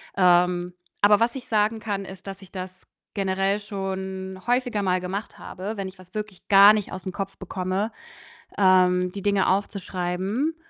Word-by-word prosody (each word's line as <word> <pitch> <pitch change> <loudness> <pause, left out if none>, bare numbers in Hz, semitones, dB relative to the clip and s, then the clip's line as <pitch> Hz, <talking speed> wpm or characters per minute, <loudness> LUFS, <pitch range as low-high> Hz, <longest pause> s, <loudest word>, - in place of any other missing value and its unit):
Ähm, 180 -1 +3 0.3
aber 205 0 +6
was 235 +2 +1
ich 260 - -7
sagen 215 0 +1
kann, 205 -3 -3
ist, 190 0 -11
dass 195 0 -7
ich 190 - -14
das 185 -1 -8 0.3
generell 195 0 0
schon 190 -2 -5
häufiger 245 -3 +1
mal 185 -1 +2
gemacht 195 +4 -5
habe, 205 +4 -6
wenn 195 -1 -3
ich 190 +1 -11
was 185 0 -16
wirklich 210 -3 -6
gar 200 +1 +9
nicht 210 -2 -2
aus'm 185 0 -5
Kopf 195 +1 -5
bekomme, 190 +3 -2 0.7
ähm, 180 -2 +4
die 200 - -6
Dinge 200 -1 +2
aufzuschreiben 195 - -1
195 Hz, 165 wpm, -25 LUFS, 185-205 Hz, 0.7 s, gar